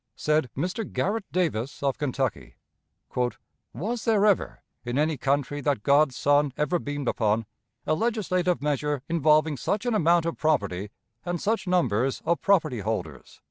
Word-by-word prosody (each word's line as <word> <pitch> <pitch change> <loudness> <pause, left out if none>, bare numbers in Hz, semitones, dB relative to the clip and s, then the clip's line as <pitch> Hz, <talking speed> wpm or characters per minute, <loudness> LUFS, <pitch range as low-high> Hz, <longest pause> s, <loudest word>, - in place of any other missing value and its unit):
Said 150 -4 +1
Mr. 180 - -2
Garrett 205 +1 -2
Davis, 145 -8 -1
of 140 -1 0
Kentucky: 125 - -2 1.2
"Was 225 +7 -3
there 215 -3 +3
ever, 205 -3 +1 0.2
in 120 +1 -3
any 155 +1 +2
country 140 +2 -1
that 140 -7 0
God's 140 -1 +4
sun 145 +1 +3
ever 150 +4 +1
beamed 145 -3 -4
upon, 110 0 +1 0.4
a - - +1
legislative 185 - 0
measure 145 -1 -1
involving 155 -2 +3
such 205 - -2
an 245 - +1
amount 170 -4 +3
of 165 - -3
property 100 - 0 0.3
and 175 -1 -2
such 215 +1 -1
numbers 135 - +1
of 170 +1 +1
property 160 - +2
holders?" 90 - -5
150 Hz, 145 wpm, -26 LUFS, 130-175 Hz, 1.2 s, God's